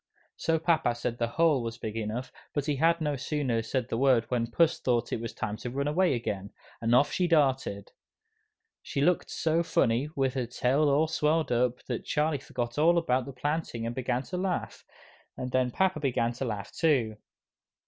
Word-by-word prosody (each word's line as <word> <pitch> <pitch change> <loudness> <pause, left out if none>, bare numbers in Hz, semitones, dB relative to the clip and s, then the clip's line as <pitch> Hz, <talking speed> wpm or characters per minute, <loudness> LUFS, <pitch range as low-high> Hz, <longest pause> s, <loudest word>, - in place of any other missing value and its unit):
Soon 160 0 0
papa 160 -8 +2
said 120 0 -3
the 115 - +1
hole 160 -5 +4
was 115 0 -5
big 110 -3 -5
enough, 115 +3 -3 0.2
but 145 -2 0
he 145 -2 0
had 165 +3 +3
no 150 -2 0
sooner 135 -4 -1
said 115 +1 -2
the 115 - -2
word, 130 -4 +4
when 115 -2 0
Puss 165 +7 +2
thought 120 -2 0
it 115 - -2
was 115 - -4
time 105 +1 -4
to 120 +2 -5
run 140 +3 -2
away 170 0 +2
again, 100 -4 -3 0.3
and 115 +1 +3
off 145 +3 +4
she 180 - +1
darted. 135 - +1 0.9
She - - -4
looked 175 +5 +2
so 160 +1 +1
funny, 125 -4 +1
with 135 -2 +1
her 130 -3 -2
tail 135 +5 +2
all 150 +3 +3
swelled 155 -1 +1
up, 125 0 +1
that 120 -3 -3
Charlie 150 -1 0
forgot 120 0 -4
all 170 +3 +5
about 130 -7 +1
the - - -5
planting 135 -3 -3
and 115 - -2
began 125 0 -1
to 180 - -5
laugh, 185 -1 -3 0.5
and 125 0 -4
then 130 -1 +2
papa 185 +5 +1
began 120 -4 0
to 130 +3 -4
laugh 105 -4 -4
too. 125 -10 +1
130 Hz, 195 wpm, -28 LUFS, 120-155 Hz, 0.9 s, all